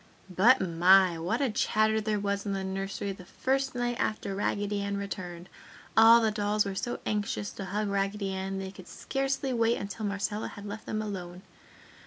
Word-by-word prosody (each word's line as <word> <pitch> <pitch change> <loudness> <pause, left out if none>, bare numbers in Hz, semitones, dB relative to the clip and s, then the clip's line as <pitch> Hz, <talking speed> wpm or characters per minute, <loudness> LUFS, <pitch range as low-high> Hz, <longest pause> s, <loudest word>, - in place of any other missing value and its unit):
But, 235 +9 +6
my! 180 0 +4
What 200 +10 -1
a 270 -4 +1
chatter 215 +1 +2
there 215 -1 0
was 200 0 -1
in 200 - -2
the 195 -1 -2
nursery 195 +1 -3
the 190 -1 -9
first 265 +7 -1
night 240 -1 -1
after 210 -2 -1
Raggedy 205 +1 -1
Ann 200 0 -2
returned. 180 -3 -6 0.5
All 225 +1 +8
the 220 -1 +2
dolls 210 0 +1
were 200 - -3
so 240 +5 -3
anxious 205 -1 -2
to 195 - -7
hug 205 +3 -2
Raggedy 200 0 -1
Ann 190 0 -3
they 190 0 -5
could 185 -2 -13
scarcely 270 0 -2
wait 230 0 +2
until 205 +2 -4
Marcella 200 +1 -2
had 205 - -9
left 210 +2 -7
them 215 0 -2
alone. 180 -3 -6
205 Hz, 185 wpm, -29 LUFS, 195-220 Hz, 0.5 s, All